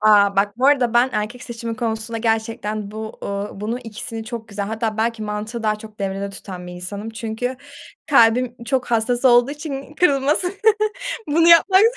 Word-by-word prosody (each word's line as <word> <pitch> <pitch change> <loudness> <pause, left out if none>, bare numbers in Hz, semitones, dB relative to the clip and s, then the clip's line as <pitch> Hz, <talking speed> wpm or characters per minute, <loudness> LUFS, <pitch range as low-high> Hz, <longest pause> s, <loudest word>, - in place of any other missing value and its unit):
A, 205 -2 +5
bak 205 +2 +1
bu 260 - +3
arada 255 -5 +3
ben 240 +2 +5
erkek 215 +4 -3
seçimi 230 -2 -5
konusunda 225 -1 -3
gerçekten 220 -2 -2
bu, 220 +1 -7
ııı, 200 0 -4
bunu 225 +4 -2
ikisini 225 0 -6
çok 230 -1 -7
güzel 200 -1 -4
hatta 220 0 -2
belki 225 0 -1
mantığı 215 +2 -4
daha 215 -1 +1
çok 215 0 -13
devrede 195 0 -3
tutan 185 -2 -8
bir 180 - -8
insanım. 200 +5 -6
Çünkü 225 +3 -4 0.5
kalbim 245 -1 +4
çok 250 +1 0
hassas 240 +2 +1
olduğu 245 +1 +6
için 290 -1 -6
kırılması, 295 +1 +2 0.8
bunu 330 +3 +4
yapmak 375 +3 +7
225 Hz, 165 wpm, -21 LUFS, 210-245 Hz, 0.8 s, yapmak